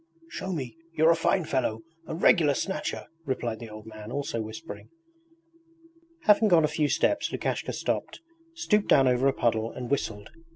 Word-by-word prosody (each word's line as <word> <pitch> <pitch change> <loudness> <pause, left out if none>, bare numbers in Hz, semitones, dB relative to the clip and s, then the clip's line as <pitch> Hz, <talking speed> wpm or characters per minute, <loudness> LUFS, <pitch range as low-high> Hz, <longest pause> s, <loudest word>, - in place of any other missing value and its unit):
'Show 190 - -4
me! 135 -7 -4 0.2
You're 160 +1 +5
a - - +4
fine 165 +1 +1
fellow, 120 -6 -1 0.3
a - - -4
regular 160 -4 +4
Snatcher!' 190 - -3 0.2
replied 120 -6 -3
the 115 - -8
old 110 0 -10
man, 110 0 -9
also 135 -4 -2
whispering. 110 +10 -8 1.3
Having 215 -3 +5
gone 170 -5 +5
a - - -3
few 150 -2 +2
steps 160 - +1
Lukashka - - -2
stopped, - - -3 0.4
stooped 210 -12 +1
down 135 -2 +5
over 125 +1 +3
a 135 - +3
puddle, 115 -2 0
and 125 0 -7
whistled. 110 -6 -2
135 Hz, 165 wpm, -27 LUFS, 115-165 Hz, 1.3 s, You're